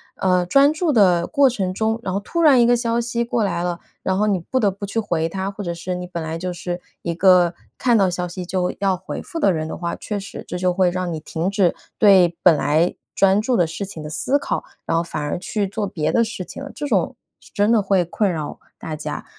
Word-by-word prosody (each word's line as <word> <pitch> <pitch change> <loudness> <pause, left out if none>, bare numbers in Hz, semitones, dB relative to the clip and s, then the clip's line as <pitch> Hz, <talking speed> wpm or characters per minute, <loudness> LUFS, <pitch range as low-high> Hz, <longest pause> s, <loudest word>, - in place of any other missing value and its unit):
呃， 180 -1 +2
专 275 +10 +5
注 310 0 0
的 180 -6 +4
过 280 -3 +4
程 195 -7 -2
中， 220 +3 0
然 190 - -2
后 200 - -1
突 335 - -2
然 285 -6 +6
一 - - +5
个 240 +1 +4
消 235 0 0
息 235 0 -2
过 235 -1 0
来 185 -4 -1
了， 175 -1 -3 0.2
然 190 0 0
后 210 +2 +2
你 200 -3 +1
不 255 +10 -2
得 205 -3 +3
不 200 +2 -7
去 200 +3 -6
回 170 -7 0
它。 190 +3 -3
或 205 - -8
者 175 -3 -3
是 170 +2 -4
你 180 0 -5
本 170 -2 -5
来 160 +1 -4
就 180 +1 -4
是 175 0 -4 0.2
一 170 - -2
个 180 -1 +5 0.2
看 240 -2 +3
到 195 -3 +3
消 180 0 -2
息 180 +1 -6
就 180 0 -1
要 195 -1 +2
回 185 +1 -6
复 330 - -6
的 195 - +4
人 155 -2 -2
的 - - -5
话， 170 -1 -3
确 210 - -4
实 200 0 -8
这 180 - -4
就 180 0 +1
会 180 0 +2
让 180 0 -2
你 160 - -3
停 160 +3 -3
止 195 -4 +2 0.2
对 185 -5 +5
本 175 -3 +6
来 155 +4 +1 0.2
专 195 +1 +4
注 245 +3 +1
的 175 -3 +3
事 165 +5 -5
情 185 -5 -8
的 150 - -6
思 265 - 0
考， - - -2 0.2
然 - - 0
后 165 - +1
反 160 -2 -5
而 145 +3 -2
去 200 +3 -2
做 205 +2 -3
别 155 -5 -2
的 235 - +4
事 220 -5 -5
情 275 - -8
了， 280 - -8
这 290 - -4
种 - - +1 0.3
是 - - -19
真 205 0 +2
的 225 -2 +4
会 190 -2 +2
困 195 +3 0
扰 155 -3 -5 0.2
大 160 - -5
家。 150 - -5
190 Hz, 280 characters per minute, -21 LUFS, 175-215 Hz, 0.3 s, 然